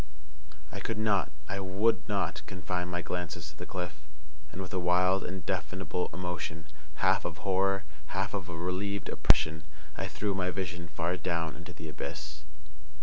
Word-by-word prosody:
I - - -4
could 115 - -1
not, 100 -6 +3 0.2
I 100 +1 -1
would 100 +4 +2
not, - - +1
confine 90 -1 -1
my 90 0 -1
glances 85 -3 -2
to - - -18
the 90 - -6
cliff; 90 -2 -2 0.6
and, 90 - -6
with 95 -1 -4
a 95 - +2
wild, 90 +2 +5
indefinable 95 0 -1
emotion, 90 -3 -3 0.3
half - - +4
of 85 -1 -4
horror, 95 0 +3 0.2
half 95 +4 0
of 95 -4 -2
a 85 - -4
relieved 95 +3 -1
oppression, 80 +1 +4 0.3
I - - -1
threw 105 -1 0
my 95 -1 +1
vision 90 -2 -2
far 85 +1 0
down 85 -3 0
into - - -8
the 80 - -7
abyss. 75 0 -5
90 Hz, 160 wpm, -32 LUFS, 85-95 Hz, 0.6 s, wild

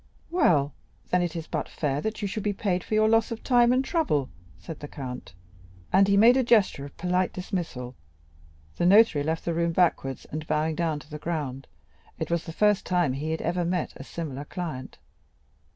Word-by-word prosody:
"Well, 150 - +3 0.4
then, 180 - +3
it 175 -2 -2
is 165 -2 -4
but - - -3
fair 145 -2 -2
that 220 +2 -4
you - - +1
should 210 +2 -4
be 205 0 -1
paid 185 -3 -1
for 215 - -2
your 215 0 +4
loss 225 +1 +3
of 230 - -6
time 240 -2 +4
and 260 +1 +2
trouble," 150 - 0 0.3
said 165 -3 -9
the 145 - -7
count; 125 - -8 0.6
and 195 +1 +6
he 200 0 +3
made 230 +4 +7
a 260 - +3
gesture 215 - +3
of 140 - -13
polite 180 +1 0
dismissal. 170 - -4 0.8
The 175 - +2
notary 200 -6 +6
left 160 +2 -2
the 170 - 0
room 170 0 0
backwards, 160 -7 +1
and 155 +1 -5
bowing 155 +1 0
down 160 -2 -1
to 155 - -18
the 150 - -6
ground; 145 -5 -4 0.5
it 160 0 -4
was 170 -1 0
the 165 - -6
first 210 +3 +2
time 175 -7 +1
he 145 +4 -4
had 160 - -2
ever 175 +2 0
met 175 0 -1
a - - -9
similar 145 -2 -6
client. 155 -7 -6
170 Hz, 200 wpm, -26 LUFS, 150-200 Hz, 0.8 s, made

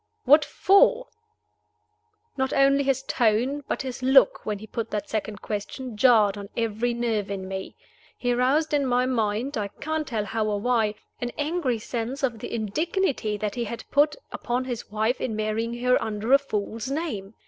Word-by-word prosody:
"What 295 +4 +6
for?" 480 +6 +3 1.3
Not 265 -1 -1
only 275 +1 +4
his 270 -1 0
tone, 245 +5 +1
but - - -2
his 260 -1 -6
look, 265 +1 +5
when 210 -1 -1
he 210 - -10
put 225 +1 -4
that 205 -1 -3
second 215 -1 -3
question, 220 +4 -5
jarred 210 -4 +4
on 200 0 -8
every 230 +1 0
nerve 225 -4 -1
in 190 -1 -4
me. 190 0 -6 0.4
He 245 -1 0
roused 275 +6 +2
in 290 -1 +3
my 250 0 +2
mind 230 +1 -1
I 205 - -1
can't 310 +7 -4
tell 220 -4 -2
how 220 0 -1
or 205 -1 0
why 220 -2 +1 0.2
an 245 0 -3
angry 295 -5 0
sense 240 +5 -4
of 240 -4 0
the - - -6
indignity 235 - -1
that 210 0 -3
he 240 -1 -2
had 230 +1 -6
put 295 +1 +4 0.2
upon 245 +2 -2
his 245 -3 -5
wife 220 +4 0
in 225 - -2
marrying 220 +2 -2
her 250 0 +3
under 220 +3 -1
a 275 - +8
false 225 -2 -4
name. 230 - -4
240 Hz, 180 wpm, -25 LUFS, 215-270 Hz, 1.3 s, a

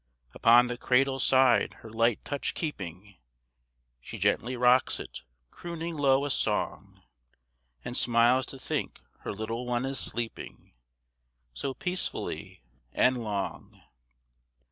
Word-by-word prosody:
Upon 120 +2 +6
the 125 0 -5
cradle's 135 +1 +2
side 130 -2 +4
her - - -8
light 115 0 +1
touch 145 -1 -3
keeping, 95 - -6 0.8
She - - -9
gently 125 +2 0
rocks 125 +1 +4
it, - - -7 0.3
crooning 170 -1 -6
low 140 -1 +3
a 145 - -2
song; - - -2 0.8
And 125 - -5
smiles 120 +2 +3
to 135 - -8
think - - -4 0.2
her - - -5
little 115 +4 -5
one 120 +1 -1
is 135 -1 +1
sleeping, 115 -1 -2 0.8
So 135 - -4
peacefully 180 - -4 0.3
and 125 -2 +2
long. 100 -3 -5
125 Hz, 120 wpm, -28 LUFS, 115-135 Hz, 0.8 s, Upon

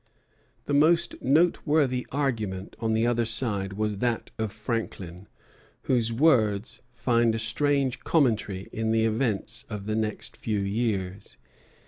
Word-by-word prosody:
The 145 - -2
most 155 +4 +3
noteworthy 145 -3 +2
argument 110 -9 -2
on 110 -1 0
the 110 +1 +2
other 120 0 +2
side 110 -4 0
was 105 0 -2
that 120 +1 -1
of 110 -2 -1
Franklin, 100 -5 -5 0.6
whose 115 -3 +1
words 115 -6 +2
find 115 -1 +1
a - - -1
strange 135 +3 +1
commentary 110 - 0
in 110 0 -1
the 110 0 +2
events 110 0 -1
of 105 -3 -6
the 110 0 -1
next 110 -1 -3
few 110 -2 -2
years. 100 -1 -2
115 Hz, 130 wpm, -26 LUFS, 105-125 Hz, 0.6 s, most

